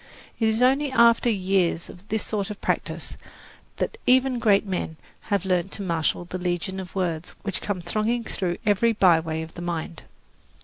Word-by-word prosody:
It 225 - +3
is 220 +2 +2
only 270 +2 +3
after 235 -1 +5
years 190 -5 +1
of 180 +3 -13
this 220 0 -1
sort 205 -2 -2
of 210 - -6
practice - - -2 0.6
that - - -2
even 255 0 +4
great 210 -3 +4
men 180 -4 -3 0.3
have 200 -3 +1
learned 185 0 0
to 200 - -4
marshal 170 -1 0
the 185 +1 -5
legion 180 +1 -2
of 185 0 -8
words 175 -3 -2
which 200 -3 -2
come 200 -3 -2
thronging 215 +7 -1
through 180 -5 -2
every 215 +3 +3
byway 165 -5 +3
of 160 - -10
the 175 - -8
mind. 170 -2 -4
190 Hz, 175 wpm, -25 LUFS, 175-220 Hz, 0.6 s, after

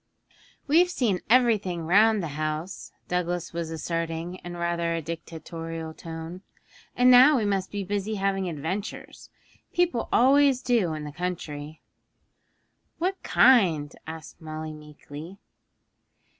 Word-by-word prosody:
'We've 340 +5 +4
seen 225 - 0
everything 215 -9 +3
round 210 +3 +4
the 165 - -3
house,' 155 +5 -4 0.2
Douglas 175 -1 -2
was 170 -1 -3
asserting 165 +2 -3
in 175 0 -7
rather 170 -1 -1
a - - -1
dictatorial 165 0 -6
tone; 165 +2 -8 0.5
'and 250 +1 +5
now 260 +4 +8
we 220 - 0
must 195 -2 0
be 205 -1 -4
busy 205 +2 -2
having 195 -2 -1
adventures 170 +7 -5 0.4
people 350 -9 0
always 270 +1 +4
do 210 -10 +1
in 155 - -6
the 150 - -6
country.' 155 -3 -5 1.2
'What 370 +3 -2
kind?' 175 - +4
asked 160 +1 -9
Molly 155 0 -6
meekly. 150 +3 -11
175 Hz, 120 wpm, -26 LUFS, 160-215 Hz, 1.2 s, now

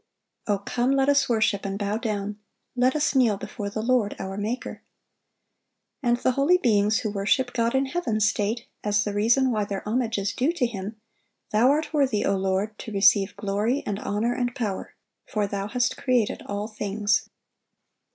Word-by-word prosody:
"O 205 -1 +2
come, 240 +6 0
let 270 0 +3
us 280 -2 +3
worship 220 -3 +1
and 195 0 -3
bow 205 0 -1
down: 210 -2 -3 0.4
let 255 +2 +2
us 305 0 +1
kneel 240 -7 +3
before 205 +1 -5
the 215 +2 -4
Lord 235 -4 +1
our 190 0 -5
Maker."(728) 215 +5 -4 1.2
And 240 -2 +2
the 255 - +1
holy 280 +8 +3
beings 215 - +2
who 215 - -2
worship 220 +5 +1
God 230 +1 +1
in 265 +1 +2
heaven 265 -7 -1
state, 215 +2 0 0.2
as 210 0 +2
the 205 - -3
reason 235 +6 +3
why 215 -2 0
their 200 0 -5
homage 230 0 0
is 200 0 -1
due 285 +7 +1
to 290 -8 +1
Him, 215 -1 -5 0.5
"Thou 225 +4 +4
art 305 +3 0
worthy, 270 -8 +2
O 195 - +2
Lord, 195 +2 -1
to 220 - -7
receive 195 0 +4
glory 215 +7 -1
and 205 -1 -2
honor 220 +4 -1
and 245 -1 -2
power: 210 -5 -4 0.3
for 210 -1 0
Thou 200 0 -3
hast 245 +3 0
created 245 -5 +1
all 205 +1 -3
things." 210 -1 -1
220 Hz, 180 wpm, -25 LUFS, 205-250 Hz, 1.2 s, Thou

